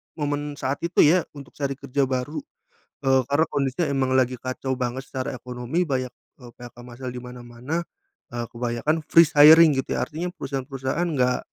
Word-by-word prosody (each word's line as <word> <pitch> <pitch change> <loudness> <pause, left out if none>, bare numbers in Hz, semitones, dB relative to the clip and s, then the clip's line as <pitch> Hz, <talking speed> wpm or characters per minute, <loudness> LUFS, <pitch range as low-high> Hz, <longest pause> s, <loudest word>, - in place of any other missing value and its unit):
momen 145 -1 -3
saat 140 0 -3
itu, 170 - +4
ya, 170 +3 +4
untuk 140 -2 -11
cari 140 -1 -2
kerja 140 0 -1
baru. 130 +4 -3 0.7
Eee, 135 0 +4
karena 145 +3 +3
kondisinya 140 +4 0
emang 135 -1 0
lagi 130 -1 +1
kacau 130 +1 -4
banget 125 +1 -3
secara 130 0 -5
ekonomi, 125 +7 -3
banyak, 130 -5 -2 0.3
eee, 120 -1 -12
PHK 120 -1 -12
massal 125 +1 -8
di 125 - -7
mana-mana, 125 +6 -6 0.5
eee, 120 -1 -3
kebanyakan 120 +7 -2
freeze 165 -1 +4
hiring, 155 0 +8
gitu, - - -6
ya. - - -1
Artinya 165 +4 -4
perusahaan-perusahaan 135 +2 -3
nggak, 125 -3 +1
135 Hz, 165 wpm, -24 LUFS, 125-145 Hz, 0.7 s, hiring